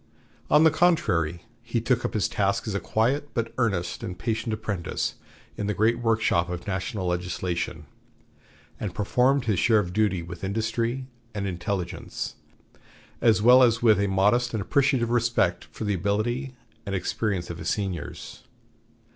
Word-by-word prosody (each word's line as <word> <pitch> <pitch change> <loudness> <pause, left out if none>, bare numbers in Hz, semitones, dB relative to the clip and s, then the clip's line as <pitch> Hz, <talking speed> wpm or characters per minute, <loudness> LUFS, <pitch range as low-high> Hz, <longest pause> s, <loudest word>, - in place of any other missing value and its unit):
On 150 +2 +6
the 160 - +6
contrary, 115 - +2 0.2
he 115 0 -2
took 120 +1 +1
up - - -3
his 100 -5 +2
task 100 0 0
as 110 - -2
a 100 - 0
quiet 135 +9 0
but 115 -2 -2
earnest 95 -8 0
and 90 - -5
patient 110 +5 -2
apprentice 100 -5 -2 0.4
in 105 - -2
the 105 - -1
great 115 +3 +2
workshop 110 -7 +1
of 90 -1 -5
national 95 +1 -3
legislation, 90 0 -2 0.9
and 95 -5 -4
performed 125 +6 +2
his 105 -6 +1
share 115 +2 +4
of 90 -4 -1
duty 100 -4 +1
with 85 +1 -9
industry 115 +5 -1 0.3
and 100 -1 -2
intelligence, 90 0 -4 0.9
as 110 -3 +4
well 125 +2 +8
as 115 -2 +4
with 110 -3 +5
a 100 - +2
modest 105 +6 +2
and 110 - -1
appreciative 130 -2 +2
respect 115 -7 +1
for - - -8
the 105 -1 0
ability 110 - -1 0.3
and 100 -1 -3
experience 95 -1 -2
of 85 - -7
his 80 +1 -3
seniors. 95 -3 -4
105 Hz, 155 wpm, -26 LUFS, 95-120 Hz, 0.9 s, well